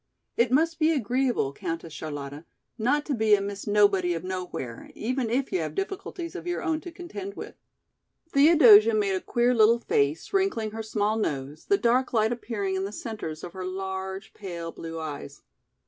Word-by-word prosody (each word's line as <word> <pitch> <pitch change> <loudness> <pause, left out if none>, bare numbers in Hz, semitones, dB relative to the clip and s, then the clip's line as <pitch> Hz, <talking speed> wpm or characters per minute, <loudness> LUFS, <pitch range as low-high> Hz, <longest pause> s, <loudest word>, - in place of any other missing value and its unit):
"It 235 +1 +2
must 325 +4 +2
be 315 0 +4
agreeable, 250 - 0
Countess 165 +1 -5
Charlotta, 145 -1 -6 0.3
not 270 +6 +1
to 295 - -1
be 220 -3 +4
a - - -1
Miss 200 +1 -5
Nobody 200 -4 +3
of 165 - -5
Nowhere, 180 -10 -5
even 250 +1 -2
if 255 +3 0
you 370 - +1
have - - -4
difficulties 390 -3 -4
of 365 - -7
your 350 - -2
own 320 -1 0
to 350 - -8
contend 370 +3 -7
with." - - -8 0.8
Theodosia 245 -8 +7
made 205 -2 +1
a 185 - -1
queer 240 +1 +2
little 230 0 +5
face, 150 - 0
wrinkling 380 - +1
her 225 +1 -5
small 215 0 0
nose, 145 -6 -3
the 400 - +3
dark 250 -3 +2
light 220 -1 +3
appearing 220 -5 -3
in 190 0 -1
the 200 - -4
centres 205 -8 -6
of 175 - -7
her 185 - -6
large, 190 +1 -5
pale 170 -4 -6
blue 165 0 -7
eyes. 145 - -7
215 Hz, 180 wpm, -27 LUFS, 185-265 Hz, 0.8 s, Theodosia